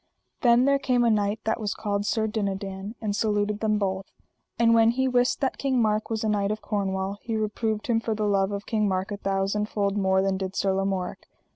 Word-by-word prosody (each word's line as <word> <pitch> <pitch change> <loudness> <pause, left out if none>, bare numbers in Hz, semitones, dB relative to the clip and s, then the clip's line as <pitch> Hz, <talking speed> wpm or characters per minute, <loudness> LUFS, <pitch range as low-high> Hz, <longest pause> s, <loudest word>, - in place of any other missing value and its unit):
Then 240 0 +5
there 280 0 +3
came 250 -3 +2
a 235 - +4
knight 210 0 0
that 220 - -1
was 210 -3 -2
called 205 -1 -2
Sir 220 -1 +1
Dinadan, 200 -1 -3
and 210 -2 -1
saluted 210 -1 0
them 215 -1 +1
both. 195 -1 -2 0.5
And 230 0 +4
when 225 0 +5
he 260 +3 +1
wist 250 +1 +1
that 270 - -1
King 265 -2 +1
Mark 215 -1 +1
was 225 -1 -2
a - - 0
knight 205 -2 +1
of 215 +1 -2
Cornwall 195 -1 -2
he 230 -2 -3
reproved 215 0 -2
him 230 -2 +2
for 225 -1 -2
the 215 0 -1
love 195 -1 +2
of 200 0 -4
King 215 -2 0
Mark 190 +1 -1
a 205 - -3
thousand 195 +2 -1
fold 200 -1 -1
more 190 -1 +2
than 195 -1 0
did 190 0 -4
Sir 195 -1 +1
Lamorak. 195 -1 -2
210 Hz, 225 wpm, -26 LUFS, 195-225 Hz, 0.5 s, Then